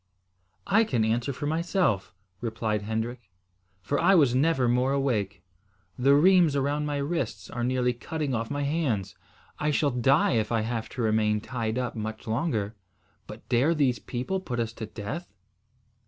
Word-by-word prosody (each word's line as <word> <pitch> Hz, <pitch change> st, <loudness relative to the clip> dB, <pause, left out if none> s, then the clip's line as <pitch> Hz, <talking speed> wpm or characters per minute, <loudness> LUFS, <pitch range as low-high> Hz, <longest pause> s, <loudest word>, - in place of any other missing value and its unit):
"I 215 Hz, +3 st, +4 dB
can 120 Hz, -, 0 dB
answer 120 Hz, +4 st, 0 dB
for 135 Hz, +2 st, -5 dB
myself," 160 Hz, -, 0 dB, 0.3 s
replied 110 Hz, -2 st, -2 dB
Hendrik, 110 Hz, +1 st, -4 dB, 0.5 s
"for 145 Hz, -, 0 dB
I 195 Hz, +3 st, +5 dB
was 140 Hz, -8 st, +5 dB
never 135 Hz, -1 st, +2 dB
more 125 Hz, +3 st, +2 dB
awake. 120 Hz, -8 st, -1 dB, 0.5 s
The 135 Hz, +3 st, +4 dB
rheims 175 Hz, -1 st, +5 dB
around 145 Hz, +2 st, 0 dB
my 145 Hz, -1 st, -1 dB
wrists 140 Hz, -, -3 dB
are 120 Hz, -, -3 dB
nearly 125 Hz, 0 st, +1 dB
cutting 145 Hz, +3 st, -3 dB
off 115 Hz, -1 st, -2 dB
my 145 Hz, 0 st, -2 dB
hands. 135 Hz, -, -1 dB, 0.5 s
I 150 Hz, -, 0 dB
shall 145 Hz, -1 st, +2 dB
die 130 Hz, +4 st, +3 dB
if 110 Hz, 0 st, -1 dB
I 115 Hz, -2 st, +2 dB
have 115 Hz, 0 st, -3 dB
to 120 Hz, -, 0 dB
remain 110 Hz, -1 st, +2 dB
tied 115 Hz, 0 st, -3 dB
up 125 Hz, -1 st, -2 dB
much 110 Hz, 0 st, -5 dB
longer. 115 Hz, -3 st, -1 dB, 0.5 s
But -, -, -11 dB
dare 130 Hz, +7 st, +3 dB
these 135 Hz, -5 st, +2 dB
people 130 Hz, +10 st, -3 dB
put 125 Hz, -10 st, -4 dB
us 115 Hz, -1 st, -2 dB
to 110 Hz, -2 st, -6 dB
death?" 115 Hz, -, -6 dB
125 Hz, 165 wpm, -27 LUFS, 110-145 Hz, 0.5 s, I